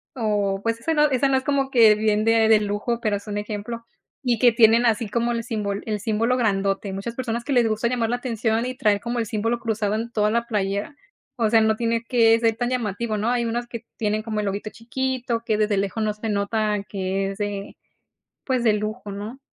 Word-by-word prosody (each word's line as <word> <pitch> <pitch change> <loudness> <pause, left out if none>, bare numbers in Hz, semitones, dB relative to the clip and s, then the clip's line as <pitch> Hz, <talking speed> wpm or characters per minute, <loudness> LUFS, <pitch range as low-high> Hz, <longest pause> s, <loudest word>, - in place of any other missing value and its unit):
o 205 -5 0
pues, 230 0 -1
esa 325 +7 -1
no 300 -1 +4
esa 265 0 +2
no 265 - +3
es 260 - -2
como 275 -1 0
que 225 -4 +6
bien 215 0 +1
de 225 -1 +4
de 220 - +6
lujo, 210 +3 -2
pero 215 -3 +1
es 200 - -13
un 205 0 -3
ejemplo, 215 +3 -5 0.4
y 240 -3 +1
que 245 0 +6
tienen 230 +1 +5
así 225 -1 +1
como 235 +2 0
el 230 -1 -2
simbol 210 -4 -3
el 210 -1 -1
símbolo 230 +4 0
grandote. 195 -3 0
Muchas 200 +5 -5
personas 235 -2 -3
que 280 - -2
les 240 -3 +4
gusta 220 +2 0
llamar 235 -2 0
la 245 - 0
atención 230 -2 -1
y 255 0 -4
traer 210 -5 +2
como 240 0 -3
el 230 - 0
símbolo 225 +2 -1
cruzado 215 -3 -1
en 230 +2 -3
toda 210 -2 +1
la 235 +1 0
playera, 200 +3 -2 0.4
o 225 -2 +2
sea, 225 -1 +5
no 220 0 +3
tiene 230 0 0
que 230 -1 +4
ser 225 -1 +2
tan 245 0 -1
llamativo, 225 -2 -2
¿no? 215 +3 0
Hay 240 -1 +1
unas 240 +1 -2
que 235 -1 -8
tienen 215 0 0
como 220 -2 -3
el - - -3
loguito 200 +2 -3
chiquito, 245 0 -3
que 220 -3 +1
desde 210 -1 +1
lejos 200 +3 -1
no 210 -1 0
se 215 +1 -5
nota 210 0 0
que 195 0 -2
es 195 - -9
de, 205 -1 -4 0.7
pues, 255 -3 0
de 220 -3 +4
lujo, 215 0 -4
¿no? 210 +6 -7
225 Hz, 230 wpm, -23 LUFS, 210-235 Hz, 0.7 s, que